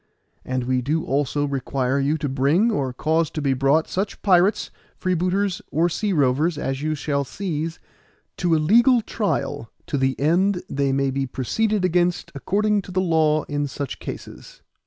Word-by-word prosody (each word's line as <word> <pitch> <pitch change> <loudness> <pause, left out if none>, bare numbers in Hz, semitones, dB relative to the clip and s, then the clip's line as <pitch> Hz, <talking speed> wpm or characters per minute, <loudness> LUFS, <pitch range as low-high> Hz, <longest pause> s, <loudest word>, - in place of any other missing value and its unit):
And 130 -1 -2
we 130 0 0
do 155 +6 -1
also 145 +1 0
require 135 -1 -1
you 145 +3 +1
to 150 -1 -3
bring, 145 - +2
or 135 - -1
cause 160 +5 0
to 155 - -5
be 140 -2 +1
brought, 135 +5 +2
such 195 +2 -3
pirates, 190 +1 +3 0.3
freebooters, 185 +2 0
or 170 +3 +2
sea 205 +4 -1
rovers, 150 +1 +2
as 135 -2 -3
you 155 +1 -1
shall 140 -1 -1
seize, 160 +1 -4 0.6
to 175 -2 +2
a - - +3
legal 235 - +4
trial, 205 - -2 0.2
to 145 - -2
the 130 0 0
end 180 +6 +2
they 140 -5 0
may 135 0 +1
be 135 0 -2
proceeded 205 - 0
against 175 0 +1
according 205 +8 0
to 190 - -11
the 185 - 0
law 160 -4 +2
in 145 -1 -2
such 140 0 -5
cases. - - -9
155 Hz, 170 wpm, -23 LUFS, 140-185 Hz, 0.6 s, legal